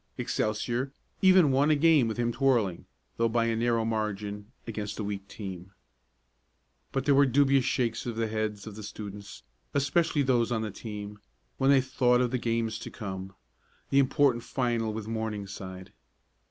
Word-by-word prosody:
Excelsior 120 +5 -1 0.3
even 185 -6 +6
won 140 +3 +3
a 155 - +5
game 150 -4 +5
with 110 - -3
him 120 0 +1
twirling, 120 -8 +1 0.3
though 115 0 +2
by 115 0 +1
a 115 -1 +1
narrow 115 0 +1
margin, 105 -2 -2
and 105 0 -10 0.2
against 105 -3 -5
a 110 - -3
weak 100 -1 -4
team. 95 -2 -8 1.2
But 135 0 -1
there 145 - +5
were 140 0 +5
dubious 135 0 +3
shakes 120 -2 -1
of 120 - -3
the 115 0 0
heads 110 -1 -3
of 110 -2 -8
the 110 - -8
students 100 -1 -8 0.3
especially 145 +2 +2
those 125 -3 +2
on 110 -2 0
the 110 - -3
team 105 0 -7 0.4
when 135 - +3
they 140 -1 +6
thought 125 -1 +2
of 125 -1 +1
the 130 - 0
games 115 -2 -1
to - - -7
come 95 -3 -7 0.6
the 140 - +5
important 130 -3 +3
final 120 -4 -1
with 110 0 -5
Morningside. 100 -4 -5
115 Hz, 170 wpm, -28 LUFS, 105-130 Hz, 1.2 s, even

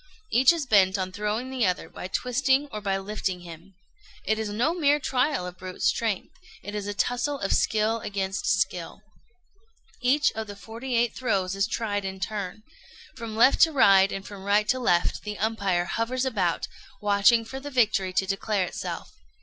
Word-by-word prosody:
Each 255 +4 +6
is 335 -4 -2
bent 200 -4 +4
on 185 -1 -3
throwing 210 +6 -3
the 260 -2 -1
other 180 - -1
by - - -8
twisting 265 +6 +1
or 210 - -5
by 195 -1 0
lifting 195 -2 -3
him. 175 +2 -12 0.5
It 220 0 +1
is 220 -1 -2
no 235 +10 +1
mere 295 -4 +3
trial 265 -5 0
of 180 0 -8
brute 185 0 -7
strength; 220 -5 0 0.3
it 205 - -7
is 205 -1 -4
a 205 - -4
tussle 245 +6 0
of 195 - 0
skill 220 +1 +1
against 195 -2 -3
skill. 185 -2 -1 1.0
Each 275 +4 +3
of 220 0 -5
the 205 - -8
forty 230 +5 -6
eight 235 -1 +1
throws 195 -7 -1
is 195 0 +1
tried 205 -3 -2
in 190 0 -5
turn. 205 +1 -4 0.5
From 230 -3 -6
left 245 +5 +5
to 325 - +7
right, 195 -8 +5
and 195 0 -5
from 200 -2 -9
right 205 +1 +2
to 255 - +2
left, 175 -8 +1
the 210 -1 -6
umpire 200 -5 0
hovers 245 +6 -1
about, 195 -9 0 0.3
watching 205 +3 +4
for 265 +4 -7
the 285 +2 -7
victory 215 -7 +2
to 190 +1 +1
declare 195 0 -1
itself. - - -6
210 Hz, 180 wpm, -26 LUFS, 195-245 Hz, 1.0 s, to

